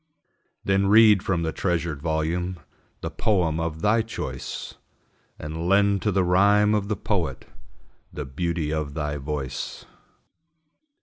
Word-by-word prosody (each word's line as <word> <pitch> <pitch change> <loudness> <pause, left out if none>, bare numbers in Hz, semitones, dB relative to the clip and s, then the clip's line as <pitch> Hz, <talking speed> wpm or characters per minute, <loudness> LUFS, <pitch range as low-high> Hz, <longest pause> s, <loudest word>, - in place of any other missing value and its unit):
Then 95 0 +2
read 105 -1 +7
from 90 -4 -1
the 80 - -1
treasured 85 -5 -2
volume 85 +3 -1 0.4
The - - -4
poem 85 -7 +1
of 80 -1 -3
thy 110 +2 +4
choice, 115 0 -6 0.6
And 80 +3 -5
lend 100 0 +3
to 105 - +1
the 95 -1 +2
rhyme 100 +4 +4
of 105 -2 0
the 105 - -1
poet 85 - -2 0.7
The 75 - -5
beauty 80 +2 -2
of 75 -2 -3
thy 75 -2 -2
voice. 70 -2 -5
85 Hz, 130 wpm, -25 LUFS, 80-100 Hz, 0.7 s, read